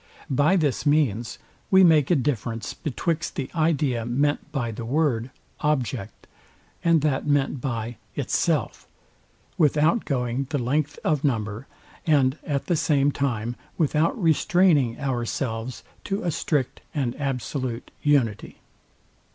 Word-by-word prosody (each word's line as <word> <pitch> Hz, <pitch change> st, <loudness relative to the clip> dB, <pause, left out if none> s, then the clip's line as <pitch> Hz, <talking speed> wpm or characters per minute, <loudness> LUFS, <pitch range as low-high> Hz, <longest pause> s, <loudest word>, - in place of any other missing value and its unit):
By 145 Hz, +7 st, +3 dB
this 150 Hz, -8 st, +1 dB
means 140 Hz, -7 st, +1 dB, 0.3 s
we 190 Hz, 0 st, +6 dB
make 155 Hz, -5 st, +5 dB
a 175 Hz, -, +5 dB
difference, 120 Hz, -5 st, -2 dB
betwixt 165 Hz, +2 st, -2 dB
the 135 Hz, -, -4 dB
idea 150 Hz, -7 st, +1 dB
meant 140 Hz, +5 st, 0 dB
by 120 Hz, -5 st, -2 dB
the 115 Hz, +2 st, -6 dB
word, 125 Hz, -2 st, 0 dB, 0.3 s
OBJECT, 130 Hz, -8 st, -2 dB, 0.6 s
and 165 Hz, -3 st, +4 dB
that 150 Hz, -1 st, 0 dB
meant 145 Hz, -2 st, +1 dB
by 120 Hz, -3 st, -3 dB, 0.2 s
ITSELF, 145 Hz, +1 st, -1 dB, 0.7 s
without 155 Hz, -, +3 dB
going 125 Hz, 0 st, -1 dB
the 150 Hz, -, 0 dB
length 145 Hz, +4 st, -1 dB
of 150 Hz, -3 st, +1 dB
number, 110 Hz, -3 st, -1 dB, 0.4 s
and 140 Hz, -2 st, +3 dB
at 140 Hz, -2 st, -2 dB
the 175 Hz, -, +1 dB
same 145 Hz, -2 st, +2 dB
time 120 Hz, -5 st, -2 dB, 0.2 s
without 160 Hz, -, +1 dB
restraining 165 Hz, -, +3 dB
ourselves 120 Hz, -2 st, -3 dB, 0.2 s
to 200 Hz, +2 st, -2 dB
a 175 Hz, -, 0 dB
strict 145 Hz, -4 st, -1 dB
and 130 Hz, -5 st, -1 dB
absolute 130 Hz, -2 st, -3 dB
unity. 130 Hz, -8 st, +1 dB
140 Hz, 125 wpm, -25 LUFS, 120-155 Hz, 0.7 s, we